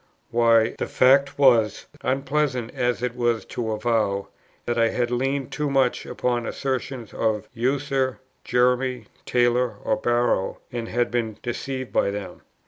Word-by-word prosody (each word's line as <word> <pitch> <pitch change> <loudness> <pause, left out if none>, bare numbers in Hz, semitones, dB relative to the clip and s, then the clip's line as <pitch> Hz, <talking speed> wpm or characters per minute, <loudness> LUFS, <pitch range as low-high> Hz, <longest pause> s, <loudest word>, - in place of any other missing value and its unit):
why, 115 -1 +4
the - - -1
fact 135 +2 +4
was, 115 -7 +4 0.2
unpleasant 135 -2 -1
as 125 -1 -1
it 125 -1 -1
was 120 -2 0
to 115 -2 -3
avow, 110 -3 0 0.4
that 120 - -1
I 115 -1 +3
had 120 0 -1
leaned 135 +2 -1
too 150 -1 -1
much 135 -2 +1
upon 120 -1 -1
the - - -4
assertions 130 -3 -4
of 110 -2 -1
Ussher, 130 +1 0 0.3
Jeremy 125 -1 +1 0.2
Taylor, 120 -1 +2
or 110 - +1
Barrow, 120 -4 +1
and 120 -2 -4
had 120 +1 0
been 115 -3 -1
deceived 130 +1 -4
by - - +2
them. 100 0 -6
120 Hz, 145 wpm, -24 LUFS, 115-130 Hz, 0.4 s, why